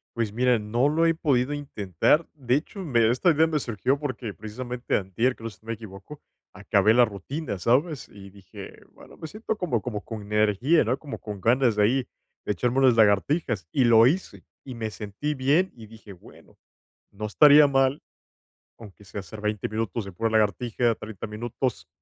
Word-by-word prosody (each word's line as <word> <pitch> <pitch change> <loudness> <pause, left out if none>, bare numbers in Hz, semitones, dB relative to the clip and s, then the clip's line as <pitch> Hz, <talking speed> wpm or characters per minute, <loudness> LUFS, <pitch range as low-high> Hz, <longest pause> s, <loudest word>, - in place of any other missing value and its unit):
Pues, 115 -3 -2
mira, 125 +1 +2
no 120 +6 0
lo 165 +2 +2
he 165 - +3
podido 140 -4 0
intentar. 140 - 0
De 130 -5 0
hecho, 160 +7 -4
me 120 -8 +2
esta 125 +9 +2
idea 160 +1 +3
me 155 -2 -1
surgió 125 +3 -1
porque 130 -7 -5
precisamente 120 +4 -5
antier, 110 +7 -1
creo 115 0 -7
si 105 - -21
me 115 - -3
equivoco, 110 +5 -11 0.3
acabé 110 - +2
la 125 0 +6
rutina, 105 - -6
¿sabes?, 135 - 0
y 100 -1 -13
dije: 95 -1 -12
"Bueno, - - -16
me 160 - -7
siento 215 +4 -5
como 150 - -1
como 105 -3 -5
con 110 -3 -7
energía, 105 - +2
¿no?, 125 +3 -1
como 145 -1 -8
con 105 -2 -7
ganas 120 +2 +2
de 105 - +2
ahí 125 +4 +1 0.4
de - - -1
echarme 125 +6 0
unas 130 -3 +5
lagartijas", 110 - +2
y 135 - +2
lo 115 -1 +6
hice, 180 +8 -2 0.2
y 130 - -7
me 115 -2 -4
sentí 110 +9 -5
bien, 145 +8 +2
y 115 -2 -12
dije: 110 -1 -13
"Bueno, 90 - -18 0.5
no 105 +2 -8
estaría 145 +7 +6
mal, 135 0 +1 0.8
aunque 105 -3 -13
sea 100 - -7
hacer 100 +3 -10
20 105 -1 -2
minutos 110 -1 -3
en 95 - -9
pura 115 +4 -1
lagartija, 110 +2 +1
30 105 0 -8
minutos, 110 - -4
115 Hz, 185 wpm, -25 LUFS, 105-135 Hz, 0.8 s, la